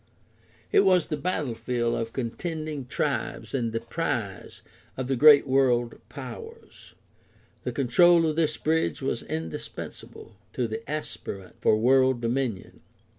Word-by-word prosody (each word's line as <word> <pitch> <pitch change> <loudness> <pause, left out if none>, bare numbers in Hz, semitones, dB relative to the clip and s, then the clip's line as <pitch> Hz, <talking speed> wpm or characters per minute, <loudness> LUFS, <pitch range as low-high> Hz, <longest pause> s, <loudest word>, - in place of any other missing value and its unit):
It 410 - +5
was 185 - +4
the 155 - -2
battlefield 125 -7 -1
of 115 0 -2
contending 150 +3 -4
tribes - - -2
and 120 -4 0
the 115 - -1
prize 115 - -4 0.3
of 130 -1 -3
the 135 - +1
great 145 +2 +8
world 130 -3 +2
powers. 460 -1 -10 0.7
The - - -1
control 165 +6 +4
of 155 -1 0
this 155 -2 +1
bridge 155 - 0
was - - -1
indispensable 80 0 -7 0.2
to 125 - -1
the 110 0 -4
aspirant 100 -10 -6
for 110 - +4
world 130 +2 +4
dominion. 120 -4 -2
130 Hz, 125 wpm, -26 LUFS, 115-155 Hz, 0.7 s, great